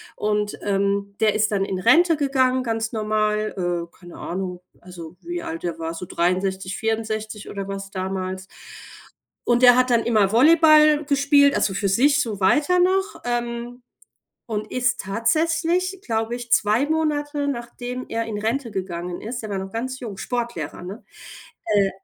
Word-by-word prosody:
und, 210 0 -1
ähm, 200 0 0
der 215 -1 +3
ist 215 0 +1
dann 195 -2 +1
in 190 -1 -3
Rente 325 - +4
gegangen, 260 -2 +2
ganz 225 -2 -2
normal, 215 -1 0 0.3
äh, - - -28
keine 175 -2 -13
Ahnung, 180 0 -5 0.2
also 175 -2 -11
wie 345 0 -5
alt 335 0 -6
der 165 -2 -3
war, 165 0 -4
so 180 - -6
63, 185 +2 -1
64 220 -1 -3
oder 200 -1 -5
was 195 0 -6
damals. 190 -1 -4 1.0
Und 240 +1 +3
der 245 -1 +9
hat 255 0 +3
dann 235 -2 +3
immer 210 -4 +2
Volleyball 305 +3 +6
gespielt, 285 0 +4
also 195 - +1
für 200 +1 -1
sich 275 +8 +3
so 215 -6 -3
weiter 295 - +3
noch, 385 +3 +1
ähm, 240 0 -3 0.7
und 215 -1 -4
ist 255 +1 0
tatsächlich, 330 - 0
glaube 225 0 -1
ich, 240 -1 -8
2 215 +6 +3
Monate, 295 -2 -1
nachdem 245 0 -5
er 230 0 -2
in 220 -2 -4
Rente 230 +4 -2
gegangen 180 -3 -5
ist 240 +3 -5
der 215 - -7
war 195 - -2
noch 190 0 -6
ganz 260 +3 -4
jung, 215 -6 -7
Sportlehrer, 230 - -4
ne? 195 +6 -8 0.6
Äh, 205 -3 +3
225 Hz, 160 wpm, -22 LUFS, 195-270 Hz, 1.0 s, der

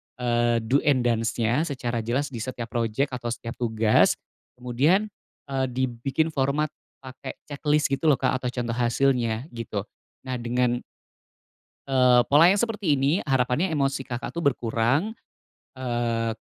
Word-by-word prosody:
eee, 120 -1 +1
do 130 +6 +2
and 130 -4 +4
don'ts-nya 115 +5 +1
secara 125 -4 -3
jelas 130 +6 -1
di 120 - -6
setiap 120 -1 -5
project 120 +3 0
atau 120 -1 -5
setiap 115 0 -5
tugas. 110 -2 +3 0.4
Kemudian, 145 - +1 0.4
eee, 130 -1 0
dibikin 130 +5 -1
format 140 +2 0 0.3
pake 130 0 -8
checklist 150 0 0
gitu 135 +4 0
loh 145 - +6
Kak 130 0 0
atau 125 - -3
contoh 120 -2 -3
hasilnya 120 -1 +1
gitu. 115 -4 -4 0.4
Nah 130 -2 -4
dengan 120 +1 0 1.1
eee, 125 -2 +5
pola 150 +4 +6
yang 200 - +1
seperti 210 -9 0
ini 135 0 +1 0.2
harapannya 135 +5 +1
emosi 135 -2 0
Kakak 120 -2 -5
tuh 170 - -2
berkurang, 135 - +1 0.6
eee, 120 -2 -1
125 Hz, 140 wpm, -25 LUFS, 120-140 Hz, 1.1 s, loh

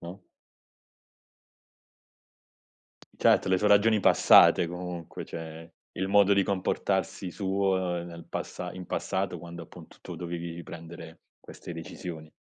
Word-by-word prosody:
no? - - -9 3.0
Certo, - - +3
le 95 -1 +3
sue 105 - +2
ragioni 105 +1 +4
passate 90 - +6
comunque, 90 -1 -7
cioè 80 0 -9 0.2
il 95 - -2
modo 100 0 +5
di 100 -1 +4
comportarsi 95 -1 -1
suo 95 -3 0
nel 85 -1 -10
passa 90 -1 -5
in 90 0 -9
passato 95 -2 -2
quando, 85 +1 -9
appunto, - - -15
tu - - -8
dovevi 85 -1 -5
riprendere 85 -1 -10 0.2
queste - - -10
decisioni. 80 -1 -8
90 Hz, 115 wpm, -28 LUFS, 85-95 Hz, 3.0 s, passate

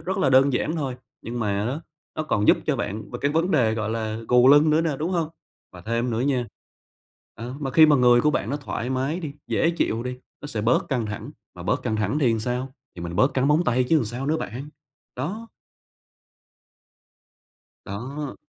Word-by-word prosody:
rất 190 +2 -3
là 140 -8 +2
đơn 135 +1 +5
giản 155 +6 -1
thôi, 135 -5 -3 0.3
nhưng 120 +1 -5
mà 100 -1 0
á 135 +6 -3 0.4
nó 155 - -1
còn 105 -9 0
giúp - - +6
cho - - +1
bạn 105 0 -4
về 120 - -5
cái 140 - +2
vấn 165 +4 +1
đề, 115 -9 +3
gọi 110 -1 -2
là, 110 -1 -3
gù 125 +1 +6
lưng 145 +2 +6
nữa 155 +1 +4
nè, 160 -4 -1
đúng 165 +4 -2
hông? 170 -4 0 0.4
Và - - -11
thêm 115 +2 -1
nữa 115 - -1
nha 130 -2 0 0.9
ờ, 120 +3 -7
mà 135 - -2
khi 155 +3 +7
mà 150 - +5
người 120 -1 +5
của 150 - +3
bạn 115 -6 -1
nó 145 - -1
thoải 130 -4 -4
mái 135 +6 -1
đi, 155 -5 -5
dễ 165 - +2
chịu 115 -9 -1
đi, 125 0 -4 0.3
nó - - -5
sẽ 115 -7 -3
bớt 120 +3 +2
căng 125 -5 -1
thẳng, 105 -1 -6 0.2
mà - - -9
bớt - - 0
căng 110 - -1
thẳng 105 +7 0
thì 130 -6 +3
làm 115 -1 0
sao? 125 +3 -3 0.2
Thì 85 - -7
mình 85 0 -5
bớt 130 +6 +3
cắn 135 +2 +2
móng 155 +4 +3
tay 125 -2 +2
chứ 160 +6 +3
làm - - -1
sao 120 +5 -5
nữa 155 +2 +1
bạn, 130 +3 -6 0.5
đó. 205 - -4 2.4
Đó. 130 +9 -5
130 Hz, 220 wpm, -24 LUFS, 115-150 Hz, 2.4 s, khi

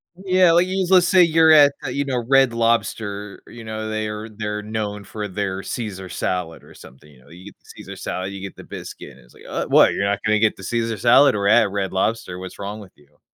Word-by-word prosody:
Yeah, 185 -2 +3
like 175 +2 +3
you 190 0 -1
let's 180 -2 +5
say 185 -2 +5
you're 160 -1 +4
at 145 -2 +7
a, - - -4
you 140 - -1
know, 125 -4 -2
Red 135 -3 +4
Lobster. 110 -3 -2
You 115 -1 -11
know, 110 0 -5
they're 110 0 -4
they're 105 -1 -5
known 105 -1 -5
for 105 +1 -6
their 95 -1 -4
Caesar 95 -6 -6
salad 90 -3 -4
or - - -16
something, 70 +4 -16
you 65 -3 -20
know? 70 - -22
You 90 +3 -14
get 100 - -12
the - - -35
Caesar - - -10
salad, 95 +1 -5
you 95 - -8
get 100 - -8
the - - -12
biscuit. - - -10
It's - - -21
like, - - -18
"Uh, - - -3
what? - - +5
You're 100 - -1
not 100 0 0
gonna 110 -1 +2
get 110 -1 +2
the 95 - -12
Caesar 115 +1 -2
salad 120 +3 +5
we're 100 -1 -1
at 110 -2 +4
Red 100 -1 -3
Lobster. 95 -2 -2
What's 95 0 -10
wrong 100 +2 -6
with 100 -3 -13
you?" 75 0 -27
105 Hz, 240 wpm, -21 LUFS, 100-120 Hz, -, at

